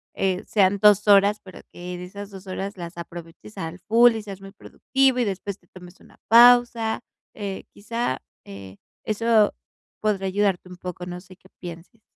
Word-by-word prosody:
eh, 190 Hz, -1 st, -1 dB
sean 200 Hz, -1 st, +2 dB
2 210 Hz, 0 st, +5 dB
horas, 205 Hz, +1 st, +5 dB
pero 185 Hz, -, -12 dB
que 180 Hz, 0 st, -7 dB
de 180 Hz, -, -8 dB
esas 200 Hz, +2 st, -9 dB
2 195 Hz, 0 st, -11 dB
horas 195 Hz, +2 st, -5 dB
las 170 Hz, 0 st, -8 dB
aproveches 170 Hz, +4 st, -10 dB
al 165 Hz, 0 st, -6 dB
full 235 Hz, +2 st, +6 dB
y 220 Hz, -, -5 dB
seas 195 Hz, -2 st, -9 dB
muy 195 Hz, 0 st, -11 dB
productivo, 265 Hz, +5 st, 0 dB
y -, -, +3 dB
después 200 Hz, 0 st, -4 dB
te 175 Hz, -, -31 dB
tomes 180 Hz, 0 st, -15 dB
una -, -, -20 dB
pausa, 235 Hz, -1 st, +5 dB, 0.3 s
eh, 200 Hz, -3 st, -5 dB
quizá, 220 Hz, -, -3 dB, 0.2 s
eh, 100 Hz, -1 st, -11 dB, 0.3 s
eso 220 Hz, 0 st, +2 dB, 0.5 s
podría 200 Hz, -3 st, 0 dB
ayudarte 195 Hz, -1 st, 0 dB
un 180 Hz, -, -10 dB
poco, 180 Hz, 0 st, -7 dB
no 180 Hz, 0 st, -7 dB
sé, 185 Hz, 0 st, -16 dB
qué 190 Hz, -, -21 dB
pienses. 175 Hz, +5 st, -10 dB
195 Hz, 180 wpm, -23 LUFS, 180-215 Hz, 0.5 s, full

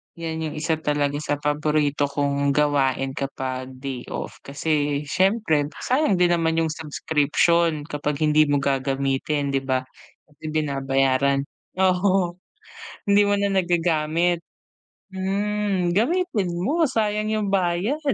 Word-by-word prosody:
'yan 165 Hz, -1 st, -4 dB
'yung 150 Hz, -, -6 dB
isa 160 Hz, +1 st, -1 dB
talaga 145 Hz, -2 st, 0 dB
sa 145 Hz, -1 st, -1 dB
paborito 145 Hz, 0 st, 0 dB
kong 140 Hz, 0 st, 0 dB
gawain 135 Hz, -2 st, +1 dB
kapag 130 Hz, -1 st, -5 dB
day 130 Hz, -2 st, -6 dB
off, -, -, -6 dB
kasi 145 Hz, 0 st, -1 dB
siyempre 185 Hz, -3 st, +1 dB, 0.2 s
sayang 255 Hz, -5 st, +2 dB
din 175 Hz, -1 st, +3 dB
naman 165 Hz, -1 st, +1 dB
'yung 160 Hz, -, -1 dB
subscription 155 Hz, +1 st, +1 dB
kapag 150 Hz, 0 st, -3 dB
hindi 155 Hz, 0 st, +4 dB
mo 145 Hz, 0 st, +2 dB
gagamitin 135 Hz, +1 st, 0 dB
di 135 Hz, -, +1 dB
ba? 130 Hz, -1 st, -1 dB, 0.4 s
Kasi 150 Hz, 0 st, -27 dB
binabayaran 135 Hz, -2 st, +1 dB, 0.4 s
oo. 185 Hz, -1 st, +2 dB, 0.7 s
Hindi 200 Hz, 0 st, +4 dB
mo 205 Hz, -, +3 dB
na 200 Hz, 0 st, 0 dB
nagagamit? 170 Hz, -2 st, +1 dB, 0.7 s
Hmm, 195 Hz, -1 st, -1 dB
gamitin 235 Hz, -, +1 dB
mo 300 Hz, -, +1 dB
sayang 215 Hz, -2 st, 0 dB
'yung 215 Hz, -2 st, 0 dB
bayad. 190 Hz, -, 0 dB
155 Hz, 120 wpm, -23 LUFS, 140-185 Hz, 0.7 s, hindi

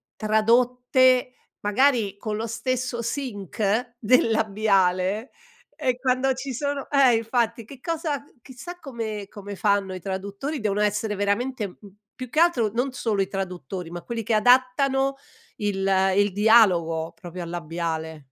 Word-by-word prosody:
tradotte 250 Hz, +4 st, +3 dB, 0.3 s
magari 210 Hz, -2 st, +2 dB
con 215 Hz, 0 st, -4 dB
lo 225 Hz, -, -3 dB
stesso 240 Hz, +1 st, -2 dB
sync 230 Hz, -, -2 dB
del 230 Hz, 0 st, +3 dB
labiale, 200 Hz, 0 st, +1 dB, 0.4 s
e 260 Hz, -5 st, -1 dB
quando 260 Hz, +1 st, +1 dB
ci 260 Hz, +1 st, -5 dB
sono 285 Hz, +2 st, -3 dB
eh, 270 Hz, -4 st, +5 dB
infatti, 230 Hz, 0 st, -1 dB
che 270 Hz, +2 st, -12 dB
cosa 315 Hz, -4 st, -2 dB
c -, -, -25 dB
chissà 270 Hz, +9 st, -10 dB
come 225 Hz, -, -5 dB
come 205 Hz, -1 st, -8 dB
fanno 200 Hz, -2 st, +1 dB
i 185 Hz, -, -6 dB
traduttori, 200 Hz, -, -4 dB
devono 210 Hz, -1 st, 0 dB
essere 210 Hz, 0 st, 0 dB
veramente 210 Hz, +3 st, -1 dB
m 180 Hz, -, -15 dB, 0.4 s
più 255 Hz, -1 st, -7 dB
che 305 Hz, -, 0 dB
altro 330 Hz, -11 st, +3 dB
non 250 Hz, +3 st, 0 dB
solo 215 Hz, -6 st, -1 dB
i 190 Hz, -, 0 dB
traduttori, 185 Hz, -3 st, -5 dB
ma 175 Hz, 0 st, -6 dB
quelli 230 Hz, +1 st, -5 dB
che 230 Hz, -, -1 dB
adattano 265 Hz, +4 st, +3 dB, 0.4 s
il 200 Hz, -2 st, -1 dB, 0.3 s
il 205 Hz, 0 st, +3 dB
dialogo, 180 Hz, -7 st, +4 dB
proprio 175 Hz, -1 st, -7 dB
al 170 Hz, -, -7 dB
labiale. 165 Hz, -2 st, -4 dB
225 Hz, 145 wpm, -24 LUFS, 200-255 Hz, 0.4 s, eh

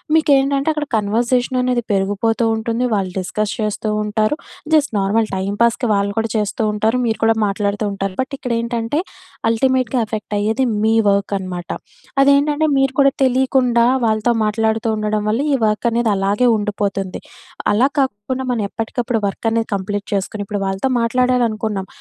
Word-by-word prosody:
మీకేంటంటే 280 Hz, -2 st, +3 dB
అక్కడ 300 Hz, -1 st, -2 dB
కన్వర్జేషన్ 240 Hz, +5 st, 0 dB
అనేది 250 Hz, -1 st, +1 dB
పెరిగిపోతూ 205 Hz, +4 st, 0 dB
ఉంటుంది. 230 Hz, +2 st, -2 dB
వాళ్ళు 190 Hz, -2 st, -1 dB
డిస్కస్ 210 Hz, +3 st, -2 dB
చేస్తూ 215 Hz, 0 st, -2 dB
ఉంటారు. 215 Hz, +5 st, 0 dB, 0.4 s
జస్ట్ 305 Hz, -1 st, +3 dB
నార్మల్ 210 Hz, +3 st, +1 dB
టైమ్ 190 Hz, +2 st, -2 dB
పాస్‌కి 235 Hz, +1 st, +2 dB
వాళ్ళు 200 Hz, 0 st, +1 dB
కూడా 225 Hz, 0 st, 0 dB
చేస్తూ 210 Hz, 0 st, -1 dB
ఉంటారు. 215 Hz, +3 st, +1 dB
మీరు 225 Hz, -1 st, 0 dB
కూడా 225 Hz, 0 st, +5 dB
మాట్లాడుతూ 205 Hz, +1 st, -1 dB
ఉంటారు. 195 Hz, -1 st, -3 dB
బట్ 260 Hz, -, -5 dB
ఇక్కడ 250 Hz, -, -4 dB
ఏంటంటే 235 Hz, +1 st, -3 dB
అంటే 230 Hz, +7 st, -1 dB, 0.5 s
అల్టిమేట్‌గా 255 Hz, +1 st, +1 dB
ఎఫెక్ట్ 215 Hz, -1 st, -5 dB
అయ్యేది 220 Hz, +5 st, +1 dB, 0.2 s
మీ 220 Hz, -, +3 dB, 0.2 s
వర్క్ 200 Hz, 0 st, +1 dB
అనమాట. 180 Hz, -2 st, -6 dB, 0.5 s
అదేంటంటే 285 Hz, +2 st, +4 dB
మీరు 270 Hz, -1 st, +2 dB
కూడా 275 Hz, 0 st, +5 dB
తెలియకుండా 255 Hz, -2 st, +3 dB, 0.2 s
వాళ్ళతో 220 Hz, +1 st, +2 dB
మాట్లాడుతూ 220 Hz, +1 st, 0 dB
ఉండడం 215 Hz, 0 st, -1 dB
వల్ల 225 Hz, +5 st, +1 dB
ఈ -, -, +4 dB
వర్కనేది 230 Hz, +2 st, +1 dB
అలాగే 200 Hz, +5 st, +1 dB
ఉండిపోతుంది. 200 Hz, -2 st, -2 dB, 0.5 s
అలా 235 Hz, +6 st, +4 dB
కాకుండా 260 Hz, 0 st, -1 dB
మనం 235 Hz, -3 st, -1 dB
ఎప్పటికప్పుడు 230 Hz, +1 st, -2 dB
వర్కనేది 225 Hz, +3 st, -1 dB
కంప్లీట్ 200 Hz, +1 st, -3 dB
చేసుకొని 200 Hz, +1 st, -2 dB
ఇప్పుడు 205 Hz, 0 st, -3 dB
వాళ్ళతో 195 Hz, +7 st, -1 dB
మాట్లాడాలనుకున్నాం, 230 Hz, -5 st, 0 dB
220 Hz, 145 wpm, -19 LUFS, 205-250 Hz, 0.5 s, కూడా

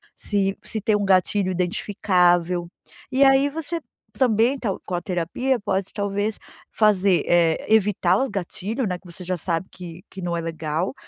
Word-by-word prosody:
se 195 Hz, -2 st, -1 dB
se 220 Hz, -, -5 dB
tem 215 Hz, +1 st, +2 dB
um 205 Hz, -1 st, 0 dB
gatilho 190 Hz, 0 st, +2 dB
identificável. 180 Hz, -1 st, +1 dB, 0.4 s
E 265 Hz, +2 st, +4 dB
aí 270 Hz, +1 st, +5 dB
você 325 Hz, +3 st, -4 dB, 0.4 s
também 245 Hz, +1 st, +3 dB
tá 230 Hz, -, -2 dB, 0.2 s
com -, -, -6 dB
a 175 Hz, -, -2 dB
terapia 185 Hz, +10 st, -1 dB
pode 195 Hz, -2 st, -2 dB
talvez 205 Hz, +1 st, -2 dB, 0.3 s
fazer, 200 Hz, -4 st, +3 dB
eh, 170 Hz, -2 st, +3 dB
evitar 195 Hz, -4 st, +3 dB
o 265 Hz, +4 st, 0 dB
gatilho, 205 Hz, +5 st, -3 dB
né, 180 Hz, -3 st, -2 dB
que -, -, -31 dB
você 175 Hz, +1 st, -10 dB
já 180 Hz, 0 st, -2 dB
sabe 170 Hz, +2 st, -2 dB
que 175 Hz, -1 st, -10 dB
que 190 Hz, -, -9 dB
não 175 Hz, -1 st, -2 dB
é -, -, -2 dB
legal 165 Hz, +2 st, -3 dB
190 Hz, 170 wpm, -23 LUFS, 175-215 Hz, 0.4 s, aí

